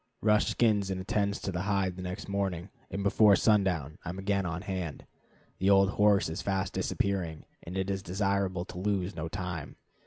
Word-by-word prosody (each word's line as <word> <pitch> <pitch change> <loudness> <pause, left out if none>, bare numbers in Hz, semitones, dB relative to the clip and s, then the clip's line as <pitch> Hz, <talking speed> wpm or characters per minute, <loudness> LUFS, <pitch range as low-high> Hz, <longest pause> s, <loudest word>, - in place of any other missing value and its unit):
Rush 105 0 +4
skins 105 -4 +2
and 95 -1 -2
attends 100 +2 0
to 95 - -2
the 90 -1 -2
hide 100 -2 0
the 90 - -7
next 90 +3 -5
morning, 95 -2 -2 0.2
and 100 - -3
before 100 +1 +6
sundown 90 -8 +2
I - - -5
am 90 - -5
again 100 -1 0
on 85 +3 -4
hand. 90 -6 -4 0.5
The 95 - +2
old 100 0 +5
horse 105 -1 +4
is 80 - -4
fast 95 -1 -1
disappearing, 90 -6 -1 0.2
and 90 +3 -6
it 95 0 -1
is 95 -1 -2
desirable 95 -1 -1
to 90 - -8
lose 100 -1 -1
no 80 0 -3
time. 90 -3 -5
95 Hz, 190 wpm, -30 LUFS, 90-100 Hz, 0.5 s, before